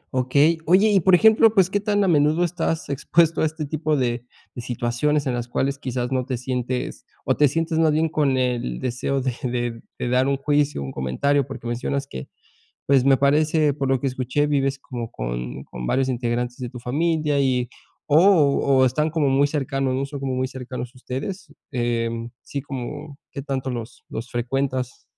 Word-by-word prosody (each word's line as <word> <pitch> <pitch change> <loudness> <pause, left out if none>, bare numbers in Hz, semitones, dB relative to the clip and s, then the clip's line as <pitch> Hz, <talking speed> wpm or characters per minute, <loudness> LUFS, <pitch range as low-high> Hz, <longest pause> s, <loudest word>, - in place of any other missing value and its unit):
Okey, 140 +6 +3
oye, 195 +5 +5
y 195 - +5
por 185 +1 +5
ejemplo, 220 +3 +6
pues, 190 -2 +4
¿qué 205 - +1
tan 205 0 +1
a - - +2
menudo 155 +1 +3
estás 165 -2 -1
expuesto 160 +4 +2
a - - +3
este 155 0 -5
tipo 155 +1 -1
de 120 -2 -1 0.3
de 120 - -6
situaciones?, 120 +5 -1
en 130 - 0
las 120 -1 -3
cuales 135 +3 -1
quizás 125 -2 -3
no 130 -1 +1
te 125 -1 -3
sientes 125 0 -3 0.2
o - - +2
te 150 - +5
sientes 165 +3 -1
más 160 -1 +4
bien 160 +1 +2
con 140 -4 +1
el 120 - -1
deseo 130 +2 -1
de 130 -1 -1
de 120 -3 -2 0.2
de - - -3
dar 130 +2 +2
un 140 0 +1
juicio, 145 - 0
un 65 - -5
comentario 130 - 0
porque 135 -3 -8
mencionas 125 +4 -2
que 65 - -8 0.6
pues, 135 -2 +3
me 135 -1 +6
parece 150 +2 +3
por 135 -1 -2
lo 135 -2 +1
que 140 - 0
escuché 130 +3 0
vives 135 -1 0
como 120 -4 -6
con - - -5
con 60 -1 -7
varios 130 0 +1
integrantes 120 0 -2
de 125 -2 -5
tu 125 - -9
familia, 150 +3 0
y 125 -3 +1 0.4
o 150 - +4 0.6
o - - +6
están 150 +5 +1
como 150 -3 +1
muy 135 +2 +3
cercanos, 135 -2 -1
¿no?, 135 +1 -1
son 140 0 -7
como 135 -1 -2
muy 130 0 -1
cercanos 125 -1 -7
ustedes, 145 +7 -6 0.2
em, 115 -1 -2
sí, 140 - -5
como, 140 +2 -7
¿qué 140 - -5
tanto 135 -1 -3
los 120 -2 -6
los 115 +2 -6
frecuentas? 130 +1 -2
135 Hz, 195 wpm, -23 LUFS, 125-150 Hz, 0.6 s, ejemplo